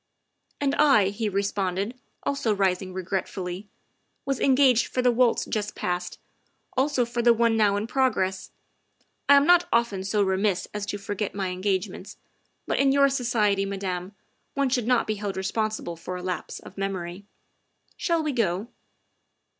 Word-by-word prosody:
' - - -52
' - - -52
" - - -42
And 280 -1 +1
I," 215 -10 +5
he 210 +2 -2
responded, 200 +1 -1 0.3
also 240 -6 0
rising 190 -1 0
regretfully, 185 +1 -4 0.3
" - - -47
was 275 -2 -1
engaged 260 -3 +4
for 255 - -2
the 250 - +5
waltz 240 0 +2
just 210 -1 -3
past; 180 0 -3 0.6
also 265 -1 +2
for 235 0 -2
the 235 0 +5
one 230 0 +3
now 210 -2 +3
in 205 - -2
progress. 225 -7 0 0.8
I 285 - +9
am 280 0 +5
not 355 +1 +5
often 235 -5 +1
so 205 +1 +1
remiss 190 0 0
as 210 -1 -4
to 205 - -3
forget 205 0 -4
my 195 -2 -2
engagements, 190 +1 -3 0.5
but - - -1
in 275 0 +4
your 280 0 +5
society, 225 -7 +1
Madame, 190 -1 -4 0.4
one 280 -1 +1
should 245 -3 0
not 250 -2 +3
be 215 -1 -2
held 200 -2 -4
responsible 205 -2 -2
for 170 +2 -6
a 180 - -6
lapse 180 -3 -4
of 195 - -12
memory. 190 0 -4 0.7
Shall 335 -3 0
we 305 - 0
go?" 215 -3 -1
205 Hz, 170 wpm, -25 LUFS, 190-245 Hz, 0.8 s, I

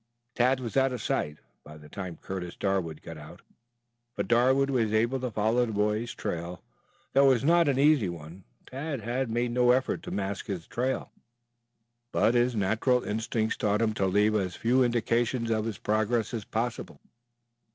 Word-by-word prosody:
Tad 125 +2 +2
was 120 -3 -6
out 135 0 +3
of 125 - -4
sight 75 -8 -2 0.3
by 75 +1 -12
the 75 0 -14
time 90 0 -7
Curtis 90 -2 -6
Darwood 95 -6 -2
got 80 -2 -8
out, 75 +3 -12 0.7
but - - -2
Darwood 130 +3 +3
was 115 -5 +1
able 115 +4 +2
to 125 0 -2
follow 110 +3 +1
the 115 - -2
boy's 105 +3 -1
trail, 85 +1 -5 0.5
though 140 +1 +5
it 135 - +7
was 125 - -1
not 170 +2 +4
an 140 -2 +2
easy 140 -8 +4
one. 85 +2 -9 0.2
Tad 140 0 -5
had 120 +3 -2
made 120 +1 0
no 125 0 +3
effort 130 +1 +2
to - - -8
mask 100 0 -3
his 90 -5 -4
trail, 130 +2 -2 1.0
but 115 - +3
his 120 0 +2
natural 110 +5 +1
instincts 110 +1 -1
taught 105 0 +1
him 110 -1 +1
to 95 -3 0
leave 105 +3 +3
as 95 -4 -1
few 125 +3 +2
indications 120 0 0
of 110 -1 0
his 110 -3 -4
progress 110 +2 0
as 110 -3 -4
possible. 115 +1 -3
115 Hz, 180 wpm, -28 LUFS, 100-125 Hz, 1.0 s, it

